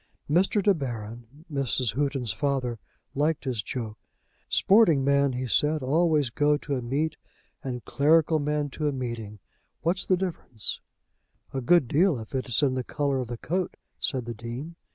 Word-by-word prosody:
Mr. 190 +6 +2
De 200 - +5
Baron, 120 - -5 0.3
Mrs. 130 -4 +1
Houghton's 135 -5 0
father, 130 -2 -1 0.3
liked 150 +2 0
his 125 -6 -1
joke. 110 -1 -5 0.5
"Sporting 190 -9 +5
men," 140 -1 +3
he 125 +1 -2
said, 150 +4 +2
"always 150 -1 +2
go 145 +2 +3
to 145 -1 -4
a 125 - -2
meet, 145 +6 -1 0.5
and 125 -2 -5
clerical 155 +2 +3
men 150 -1 -1
to 150 +2 -2
a - - +2
meeting. 115 -5 -5 0.5
What's 175 +3 0
the 185 - +4
difference?" 165 - -4 0.7
"A 135 - -2
good 155 +2 +4
deal, 165 +3 +3
if 110 +2 -9
it 130 -1 -2
is 120 - +1
in 135 -2 +3
the 130 -1 -1
colour 140 +1 -1
of 125 - -3
the 120 0 -5
coat," 180 +8 -2 0.2
said 130 -3 -1
the 120 - -4
Dean. 120 +9 -7
140 Hz, 170 wpm, -27 LUFS, 120-155 Hz, 0.7 s, De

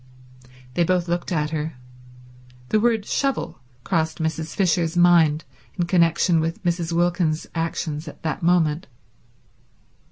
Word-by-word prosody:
They 175 - +2
both 180 0 +1
looked 175 +1 -2
at 150 -2 0
her. 155 -2 -3 0.9
The 215 - +3
word 225 -2 +1
shovel 275 - -1 0.2
crossed 160 -2 0
Mrs. 160 0 -3
Fisher's 175 -3 +1
mind 165 -3 +5 0.3
in 175 - +1
connection 170 -1 +3
with 165 +1 -3
Mrs. 170 -1 -1
Wilkins's 170 -2 +1
actions 165 -1 -3
at 150 - -11
that 160 -3 -2
moment. 170 -2 +2
170 Hz, 125 wpm, -23 LUFS, 160-175 Hz, 0.9 s, mind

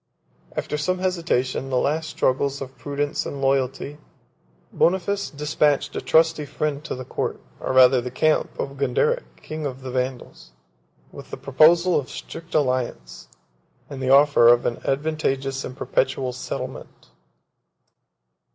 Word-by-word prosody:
After 150 - -2
some 185 +5 0
hesitation, 165 -8 -1
the 130 - 0
last 155 +5 0
struggles 140 0 0
of 135 -1 -8
prudence 145 0 -2
and 140 - -6
loyalty, 135 +2 -1 0.7
Boniface 190 +3 +1
despatched 150 0 0
a - - -2
trusty 160 -1 +3
friend 150 0 -3
to - - -4
the 130 0 -7
court, - - -3 0.2
or - - -3
rather 130 0 +7
to - - -2
the 125 - -5
camp, 155 +5 +1
of 140 0 -4
Gonderic, 475 - +1 0.2
king 155 0 -6
of 130 -1 -8
the 130 - -5
Vandals, 125 - -4 0.6
with - - -11
the - - -6
proposal 165 +6 +4
of 135 - -6
a - - -15
strict 165 0 -9
alliance, 125 - -1 0.6
and 135 -1 -6
the 130 - -1
offer 140 -3 +6
of 120 0 +5
an 120 - -2
advantageous 135 -2 -1
and 130 - -7
perpetual 130 -1 0
settlement. 125 - -7
140 Hz, 145 wpm, -23 LUFS, 130-155 Hz, 0.7 s, rather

